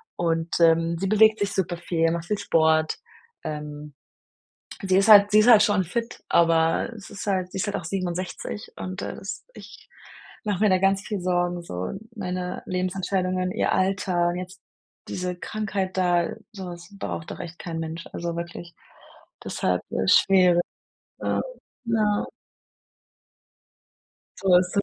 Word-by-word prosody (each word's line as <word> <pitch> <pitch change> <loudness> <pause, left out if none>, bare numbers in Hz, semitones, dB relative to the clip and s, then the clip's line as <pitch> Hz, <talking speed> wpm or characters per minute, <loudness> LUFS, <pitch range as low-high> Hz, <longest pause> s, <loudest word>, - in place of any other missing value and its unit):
Und, 165 -1 -1
ähm, 165 0 +4
sie 195 - -1
bewegt 215 +1 +5
sich 205 0 -1
super 180 -2 -1
viel, 165 -1 0
macht 170 0 -3
viel 210 +3 -1
Sport. 160 -4 +2 0.5
Ähm, 150 -1 -6 0.9
sie 190 -1 +2
ist 195 - +3
halt 205 -1 +9
sie 210 - +7
ist 215 - +4
halt 215 -3 +8
schon 205 -2 +2
fit, 230 +7 -4
aber 165 +4 +3
es 205 - -12
ist 205 - -7
halt 185 -2 0
sie - - -4
ist 190 - 0
halt 205 - -2
auch - - -6
67 185 +3 -4
und 185 0 -5
das 195 - -6
ich - - -13 0.6
mach 205 -3 -1
mir 215 - +4
da 185 - +4
ganz 195 +1 +2
viel 205 -3 -3
Sorgen, 175 -1 0
so. 90 - -5 0.2
Meine 180 -2 -4
Lebensentscheidungen, 185 0 -1
ihr - - 0
Alter, 185 -2 +1
jetzt 180 0 -7 0.5
diese 180 -1 -3
Krankheit 195 -1 -3
da, 175 -2 +2 0.2
so 195 -3 -7
was 175 -1 -9
braucht 160 -4 -5
doch - - -7
echt 170 0 -8
kein 165 -2 -5
Mensch, 165 +1 -5
also 170 0 -4
wirklich, 170 0 -7 0.7
deshalb, 90 0 -1
ja, - - -1
schwer. 180 - +5 0.6
Ja. - - 0 0.4
Ja. 215 -3 +1 2.1
So 190 -2 +4
ist 180 +2 -3
es - - +6
180 Hz, 150 wpm, -25 LUFS, 170-195 Hz, 2.1 s, halt